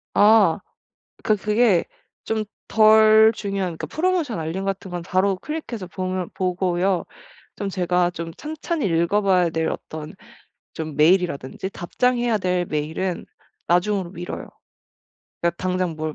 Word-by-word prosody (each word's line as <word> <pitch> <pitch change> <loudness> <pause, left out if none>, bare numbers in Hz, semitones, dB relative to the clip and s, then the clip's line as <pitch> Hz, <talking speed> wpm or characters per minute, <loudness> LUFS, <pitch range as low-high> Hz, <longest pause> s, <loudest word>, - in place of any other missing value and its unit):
아. 205 -4 +5 0.7
그 215 - +3
그게 210 -2 +2 0.4
좀 220 -1 -1 0.3
덜 220 0 +6
중요한 195 -5 -3
그러니까 - - -4
프로모션 330 - 0
알림 165 +4 -3
같은 195 -1 -3
건 175 0 -4
바로 185 +2 +1
클릭해서 240 -5 -6
보면 185 0 -3
보고요. 185 0 0 0.5
좀 200 -1 -3
제가 180 -1 +1
좀 170 -1 -6
찬찬히 310 - -4
읽어 170 +4 +2
봐야 185 -3 +3
될 160 0 -1
어떤 155 +2 -7 0.6
좀 155 -2 -5
메일이라든지 170 0 +1
답장해야 240 +5 0
될 180 -2 0
메일은 160 +4 -3 0.4
나중으로 180 +1 +1
미뤄요. 175 -1 -6 1.0
그러니까 170 - +2
당장 185 -2 -1
뭘 155 -1 -3
185 Hz, 285 characters per minute, -22 LUFS, 175-215 Hz, 1.0 s, 덜